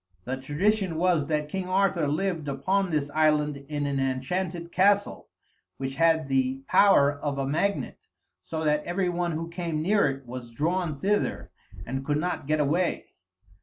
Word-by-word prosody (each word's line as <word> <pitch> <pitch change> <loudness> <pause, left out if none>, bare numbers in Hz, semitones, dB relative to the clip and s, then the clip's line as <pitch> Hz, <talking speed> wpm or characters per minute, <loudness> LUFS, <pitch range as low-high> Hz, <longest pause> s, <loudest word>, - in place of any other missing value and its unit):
The 130 +5 -3
tradition 170 +7 0
was 165 -3 +2
that 150 -1 -1
King 185 +3 -4
Arthur 185 -4 +2
lived 165 0 -1
upon 185 +8 0
this 145 -3 -1
island 150 -1 +2
in 145 -1 -2
an 140 -1 -1
enchanted 170 +7 -2
castle 200 +3 +2 0.5
which 135 0 -4
had 160 +1 +2
the 135 0 0
power 145 -8 +5
of 145 -1 -4
a 135 - -1
magnet, 180 +9 -1 0.4
so 160 -1 -4
that 150 -1 +1
every 180 +1 -1
one 175 -1 -1
who 165 +1 -3
came 170 -2 -3
near 205 +3 +3
it 135 0 -6
was 120 0 -7
drawn 155 +4 -1
thither 205 +6 -1 0.3
and 135 +1 -4
could 145 +1 0
not 175 -3 -3
get 155 0 +1
away. 165 +5 0
155 Hz, 165 wpm, -27 LUFS, 140-180 Hz, 0.5 s, power